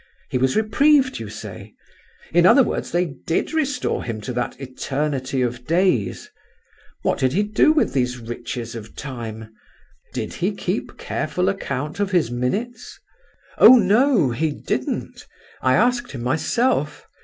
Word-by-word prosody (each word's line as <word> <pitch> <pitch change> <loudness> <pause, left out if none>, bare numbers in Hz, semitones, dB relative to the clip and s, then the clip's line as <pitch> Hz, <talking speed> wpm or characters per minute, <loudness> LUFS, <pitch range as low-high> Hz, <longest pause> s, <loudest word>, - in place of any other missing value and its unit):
He 125 - 0
was 130 0 +1
reprieved, 260 - +3
you 110 -2 -6
say; - - -9 0.6
in 175 +1 +5
other 270 +7 +7
words, - - -3
they 175 +1 +1
did 165 - -3
restore 285 -5 -1
to - - -9
him 115 -2 -3
that 125 +2 -3
'eternity 135 0 -2
of 125 0 -4
days.' 165 - +1 0.8
What - - 0
did 130 -1 +1
he 200 +5 +2
do 210 +8 +3
with 310 - +1
these 125 -2 0
riches 120 0 -6
of 110 -2 -9
time? 110 -5 -7 0.6
Did - - -4
he - - -1
keep - - -3
careful 180 +1 -1
account 150 -5 -4
of 205 -2 0
his 175 - +1
minutes?" 165 - -3 0.6
"Oh 255 - +10
no, 210 - +3
he 155 +7 0
didn't! - - -4 0.3
I 130 0 +3
asked 240 +1 +1
him 120 -3 -6
myself. 195 - 0
145 Hz, 145 wpm, -22 LUFS, -, 0.8 s, Oh